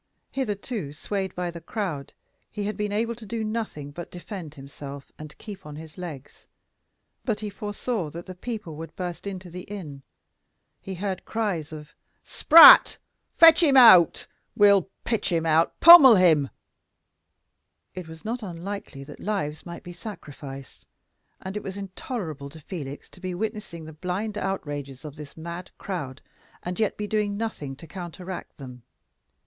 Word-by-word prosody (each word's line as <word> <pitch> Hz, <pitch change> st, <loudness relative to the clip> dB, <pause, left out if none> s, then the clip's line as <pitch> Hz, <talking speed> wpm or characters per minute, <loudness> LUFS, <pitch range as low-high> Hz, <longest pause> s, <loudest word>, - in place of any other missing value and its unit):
Hitherto 210 Hz, -, -4 dB
swayed 190 Hz, +4 st, -4 dB
by 180 Hz, -1 st, -3 dB
the 170 Hz, 0 st, -9 dB
crowd, 170 Hz, -12 st, -4 dB, 0.4 s
he 210 Hz, -, -5 dB
had 210 Hz, +1 st, -3 dB
been 210 Hz, -1 st, -2 dB
able 230 Hz, +3 st, 0 dB
to 235 Hz, 0 st, -12 dB
do 230 Hz, +1 st, -3 dB
nothing 215 Hz, -10 st, -4 dB
but 175 Hz, +3 st, -8 dB
defend 175 Hz, -4 st, -8 dB
himself 140 Hz, 0 st, -10 dB
and 155 Hz, -1 st, -10 dB
keep 205 Hz, -3 st, -10 dB
on 150 Hz, -1 st, -9 dB
his 155 Hz, 0 st, -11 dB
legs; 155 Hz, -7 st, -9 dB, 0.8 s
but 220 Hz, -5 st, -2 dB
he 210 Hz, -1 st, -4 dB
foresaw 205 Hz, -2 st, -3 dB
that 170 Hz, +3 st, -9 dB
the 185 Hz, -, -8 dB
people 210 Hz, -4 st, -6 dB
would 165 Hz, +1 st, -9 dB
burst 180 Hz, +1 st, -5 dB
into 185 Hz, -2 st, -7 dB
the 180 Hz, +2 st, -7 dB
inn; 160 Hz, -9 st, -8 dB, 0.8 s
he 190 Hz, -, -6 dB
heard 190 Hz, 0 st, -4 dB
cries 200 Hz, -10 st, -2 dB
of 150 Hz, -1 st, -10 dB, 0.3 s
"Spratt!" 330 Hz, +1 st, +9 dB, 0.4 s
"Fetch 330 Hz, +1 st, +8 dB
him 285 Hz, -5 st, +5 dB
out!" 185 Hz, -, +7 dB, 0.3 s
"We'll 200 Hz, -3 st, +5 dB
pitch 225 Hz, -4 st, -1 dB
him 165 Hz, -1 st, 0 dB
out!" 160 Hz, +1 st, +2 dB
"Pummel 320 Hz, -8 st, +11 dB
him!" 160 Hz, -7 st, +4 dB, 1.4 s
It 180 Hz, -3 st, -7 dB
was 160 Hz, +2 st, -12 dB
not 235 Hz, +3 st, -3 dB
unlikely 180 Hz, -6 st, -7 dB
that -, -, -12 dB
lives 155 Hz, -7 st, -3 dB
might 170 Hz, -, -8 dB
be 175 Hz, -, -9 dB
sacrificed; 145 Hz, -, -10 dB, 0.5 s
and 190 Hz, +1 st, -6 dB
it 210 Hz, -, -3 dB
was 195 Hz, 0 st, -7 dB
intolerable 185 Hz, -, -6 dB
to 160 Hz, +3 st, -13 dB
Felix 145 Hz, -4 st, -7 dB
to -, -, -15 dB
be 185 Hz, -1 st, -4 dB
witnessing 210 Hz, -5 st, -5 dB
the 160 Hz, -, -10 dB
blind 185 Hz, +6 st, -4 dB
outrages 145 Hz, -9 st, -4 dB
of 150 Hz, -2 st, -8 dB
this 150 Hz, -1 st, -11 dB
mad 170 Hz, +3 st, -7 dB
crowd, 145 Hz, -9 st, -6 dB, 0.4 s
and 180 Hz, +3 st, -5 dB
yet 215 Hz, -2 st, 0 dB
be 210 Hz, -, -3 dB
doing 205 Hz, -1 st, -1 dB
nothing 180 Hz, -12 st, -4 dB
to 145 Hz, -, -12 dB
counteract 180 Hz, +2 st, -8 dB
them. 125 Hz, -3 st, -10 dB
180 Hz, 160 wpm, -25 LUFS, 155-210 Hz, 1.4 s, Pummel